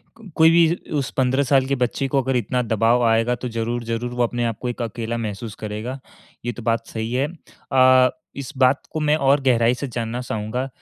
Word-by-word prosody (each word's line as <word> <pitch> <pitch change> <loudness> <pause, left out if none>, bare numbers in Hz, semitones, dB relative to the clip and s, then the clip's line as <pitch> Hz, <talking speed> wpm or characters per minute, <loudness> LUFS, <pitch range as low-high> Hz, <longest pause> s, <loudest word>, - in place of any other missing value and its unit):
को 225 -3 -14
कोई 160 0 +6
भी 170 0 +4 0.2
उस 135 -2 -1
15 130 +1 +2
साल 135 0 +3
के 140 - +1
बच्चे 125 +2 -1
को 135 0 +1
अगर 130 0 -1
इतना 125 +1 0
दबाव 115 +2 +2
आएगा 115 +2 +2
तो 125 +1 -5
ज़रूर-ज़रूर 115 +1 -3
वो 125 0 +1
अपने 120 0 -1
आप 115 -2 -2
को 125 - -2
एक 120 - -5
अकेला 115 0 -3
महसूस 110 -1 -5
करेगा, 110 +5 -5 0.5
ये 120 - 0
तो 120 - -10
बात 115 0 0
सही 110 +1 -4
है। 135 +3 +1 0.4
अ, 130 -1 +6 0.3
इस 140 +1 -6
बात 130 +1 +3
को 155 - -3
मैं 150 0 +2
और 140 -1 +3
गहराई 120 -3 +3
से 135 +3 -4
जानना 120 0 -4
चाहूँगा 125 +2 -3
125 Hz, 210 wpm, -22 LUFS, 115-135 Hz, 0.5 s, कोई